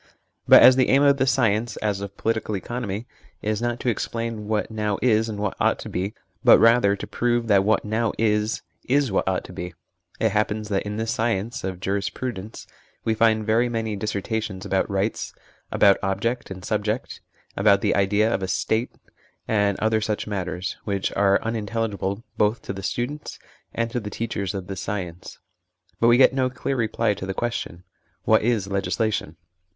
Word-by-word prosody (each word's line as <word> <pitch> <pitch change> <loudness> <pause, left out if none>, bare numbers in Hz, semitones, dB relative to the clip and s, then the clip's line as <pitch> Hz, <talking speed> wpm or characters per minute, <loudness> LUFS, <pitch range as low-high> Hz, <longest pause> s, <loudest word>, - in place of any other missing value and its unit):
But - - +9
as 130 0 +8
the 130 - +3
aim 135 +2 +5
of 140 -1 +5
this 130 0 +3
science, 115 -3 +1
as 105 -2 -1
of 100 0 -7
political 110 -1 -1
economy, 110 +1 -4 0.4
is 105 +1 -1
not 120 0 -1
to - - -4
explain 115 -1 -3
what 110 0 -1
now 105 -2 -1
is 110 -2 +2
and 105 - -4
what 105 -1 -2
ought - - +2
to - - -8
be, 95 +4 -3 0.3
but - - +8
rather 115 -3 +5
to - - -6
prove 120 -1 0
that 100 -2 +5
what 110 +2 +2
now 110 +1 0
is, 105 0 +1 0.2
is 135 -2 +2
what 95 - 0
ought 95 -1 0
to - - -11
be, 90 -1 -6 0.4
it 110 - +3
happens 105 +1 -1
that 100 0 -1
in 105 +1 -4
this 110 0 -1
science 115 0 -1
(of 95 -1 -4
jurisprudence) 100 +2 -4 0.4
we 110 - +1
find 110 -1 +2
very 115 +3 +2
many 110 -2 -2
dissertations 105 -1 -3
about 95 +1 0
rights, 100 +2 -2 0.4
about 100 -2 +4
ob 95 0 0
ject 120 +3 -2
and 95 -1 -8
subject, 105 +2 -2 0.3
about 100 0 +4
the - - +1
idea 105 +3 +2
of - - -1
a 95 - -2
State, 110 +5 0 0.6
and 105 -2 +1
other 110 0 +1
such 105 -1 -2
matters, 95 -2 -4
which 100 -2 -2
are 100 0 +3
unintelligible 110 -2 -2 0.2
both 105 +2 +2
to - - -4
the 95 - -7
students 130 +9 -4 0.3
and 115 0 -2
to 125 - -1
the 105 -2 -6
teachers 105 -3 -3
of 95 -2 -4
this 95 0 -6
science; 95 -4 -5 0.6
but 115 - +4
we 120 +1 +6
get 130 - +6
no 130 -1 +1
clear 125 +2 -3
reply 115 -2 +1
to 95 0 -7
the 95 - -3
ques 120 -1 -1
tion 85 -4 -6 0.4
what 110 - +4
is 110 -3 +1
legislation 100 -2 -1
105 Hz, 190 wpm, -24 LUFS, 100-115 Hz, 0.6 s, But